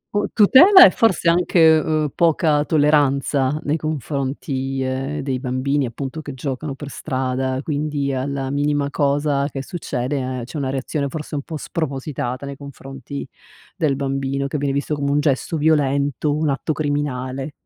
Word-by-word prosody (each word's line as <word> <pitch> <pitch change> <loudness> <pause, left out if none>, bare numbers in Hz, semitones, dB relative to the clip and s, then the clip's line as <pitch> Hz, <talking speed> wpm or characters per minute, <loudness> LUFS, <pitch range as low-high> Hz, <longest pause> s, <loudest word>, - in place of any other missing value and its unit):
U 205 - +1
tutela, 345 - +8
e - - +6
forse 190 -7 +1
anche, 175 +2 +2 0.2
ehm, 155 -2 0
poca 155 -3 +2
tolleranza 145 -2 +2
nei 150 +2 0
confronti, 135 -2 -3
ehm, 135 +3 -3
dei 135 -2 -2
bambini 130 +1 -1
appunto 135 +6 -6
che 145 -3 -8
giocano 135 +1 -4
per 145 0 -8
strada, 130 0 -2
quindi 145 -2 -2
alla 135 0 -3
minima 145 0 0
cosa 145 0 +1
che 135 0 -5
succede, 130 -5 -3
c'è 140 - -8
una 135 -2 -2
reazione 140 +2 -2
forse 155 +2 -7
un 145 - -1
po' 160 +2 -6
spropositata 135 -4 -4
nei 140 0 -6
confronti 140 0 -8 0.5
del 155 -7 +1
bambino 135 0 -2
che 140 +1 -3
viene 140 -1 0
visto 140 +2 -2
come 140 -1 -1
un 145 - +2
gesto 150 +2 0
violento, 145 -2 +1
un 155 -1 0
atto 145 +3 -1
criminale. 140 -2 -3
140 Hz, 155 wpm, -21 LUFS, 135-150 Hz, 0.5 s, tutela